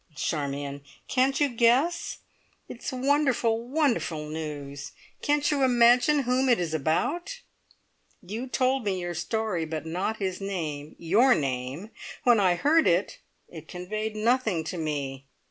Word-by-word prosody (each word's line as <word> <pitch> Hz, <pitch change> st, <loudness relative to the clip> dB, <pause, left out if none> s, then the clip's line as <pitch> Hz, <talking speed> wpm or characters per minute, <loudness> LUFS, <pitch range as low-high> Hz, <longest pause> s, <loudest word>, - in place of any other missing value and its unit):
Charmion, 140 Hz, 0 st, -3 dB, 0.3 s
can't 265 Hz, +1 st, +2 dB
you 290 Hz, -, +4 dB
guess? 255 Hz, +8 st, +2 dB, 0.5 s
It 235 Hz, -, -9 dB
is -, -, -3 dB
wonderful, 260 Hz, -4 st, +1 dB
wonderful 245 Hz, -, 0 dB
news. 150 Hz, -2 st, -6 dB, 0.3 s
Can't 295 Hz, +1 st, +1 dB
you 285 Hz, -2 st, +1 dB
imagine 250 Hz, +4 st, +5 dB
whom 255 Hz, +2 st, +1 dB
it 240 Hz, -, +4 dB
is 170 Hz, -3 st, -2 dB
about? 290 Hz, -, -1 dB, 0.8 s
You 220 Hz, +8 st, -5 dB
told 260 Hz, 0 st, +1 dB
me 195 Hz, -3 st, -1 dB
your 175 Hz, 0 st, -4 dB
story, 210 Hz, 0 st, -2 dB
but 160 Hz, 0 st, -5 dB
not 185 Hz, +7 st, -2 dB
his 190 Hz, -2 st, -3 dB
name 155 Hz, -7 st, -4 dB
your 225 Hz, +10 st, +4 dB
name! 135 Hz, -, -3 dB, 0.3 s
When 240 Hz, -3 st, +5 dB
I 185 Hz, -3 st, +3 dB
heard 305 Hz, -, +3 dB
it, 175 Hz, +4 st, +1 dB, 0.3 s
it 160 Hz, -2 st, -11 dB
conveyed 215 Hz, +5 st, -4 dB
nothing 215 Hz, -6 st, +1 dB
to 165 Hz, +3 st, -5 dB
me. 140 Hz, -3 st, -4 dB
210 Hz, 140 wpm, -27 LUFS, 160-255 Hz, 0.8 s, imagine